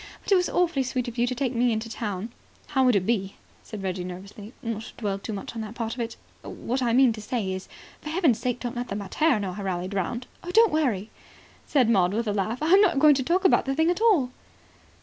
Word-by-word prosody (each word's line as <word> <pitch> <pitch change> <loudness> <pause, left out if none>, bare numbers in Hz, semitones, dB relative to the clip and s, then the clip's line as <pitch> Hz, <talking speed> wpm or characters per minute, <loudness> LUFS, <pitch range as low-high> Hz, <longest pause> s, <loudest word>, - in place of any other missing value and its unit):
But - - -6
it - - +7
was 360 -1 +2
awfully 345 -6 +1
sweet 255 -1 -2
of 240 0 -6
you 240 - +3
to 255 - -2
take 265 -1 -1
me 240 0 +2
into 220 +1 -2
town." 215 -2 -4 0.4
"How 265 -2 +2
would 250 -3 +4
it 190 -2 +1
be," 195 -4 -1 0.3
said 210 -3 -8
Reggie 185 -1 -2
nervously, 195 +4 -9
"not 225 -2 -3
to - - -10
dwell 200 -3 -2
too 220 - -6
much 200 -2 -6
on 230 - -5
that 220 +1 -7
part 225 -2 -3
of 255 - -9
it? 230 -1 -4 0.2
What 255 +3 -4
I 240 -2 +1
mean 250 0 +5
to 220 - -8
say 210 -3 -2
is, 185 0 -7 0.3
for 300 - -7
heaven's 315 - +2
sake 245 -1 -2
don't 245 0 -4
let 245 +1 -3
the 200 - -4
mater 215 +7 +1
know 190 -3 -3
I 205 - -6
rallied 185 0 -3
round." 220 +6 -2 0.3
"Don't 450 -2 +5
worry," 230 -10 0 0.6
said 265 -6 +3
Maud 195 -4 +3
with 230 0 -1
a 205 - 0
laugh. 210 +4 -1
"I'm 370 +6 +6
not 355 -8 +3
going 300 +1 +7
to 270 -1 0
talk 360 +7 +1
about 370 - +4
the 270 0 -1
thing 320 +3 +3
at 355 - -3
all." 355 - +4
235 Hz, 250 wpm, -26 LUFS, 205-270 Hz, 0.6 s, it